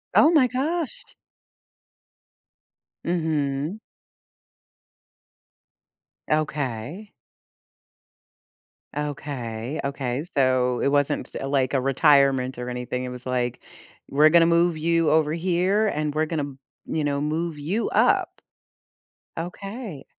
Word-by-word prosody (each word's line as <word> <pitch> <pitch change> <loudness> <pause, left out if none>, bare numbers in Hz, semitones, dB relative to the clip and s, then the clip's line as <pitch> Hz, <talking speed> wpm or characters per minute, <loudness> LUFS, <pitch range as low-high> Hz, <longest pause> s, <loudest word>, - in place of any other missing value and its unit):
Oh 305 - +7
my 295 -6 +5
gosh. 290 +5 -2 2.0
Mhm. 155 0 -1 2.5
Okay. 150 - -2 1.8
Okay, 140 -3 -4
okay, 135 -1 -2
so 130 -2 +2
it - - +2
wasn't 145 0 +1
s - - -16
like, 135 -1 0
a 135 - +2
retirement 135 -2 +3
or 125 0 -4
anything? 125 +1 -3
It - - -4
was 125 0 -9
like, 125 -1 -1 0.5
"We're 150 +3 +5
gonna 170 +1 +6
move 170 0 +3
you 165 0 +2
over 155 0 +3
here, 185 +5 +1
and 150 -5 -1
we're 155 +1 0
gonna," 145 -4 -3 0.3
you 155 - -2
know, 140 -1 0
"move 155 +2 -2
you 175 +10 -1
up." - - +2 1.0
Okay. 195 - -7
150 Hz, 100 wpm, -24 LUFS, 135-170 Hz, 2.5 s, Oh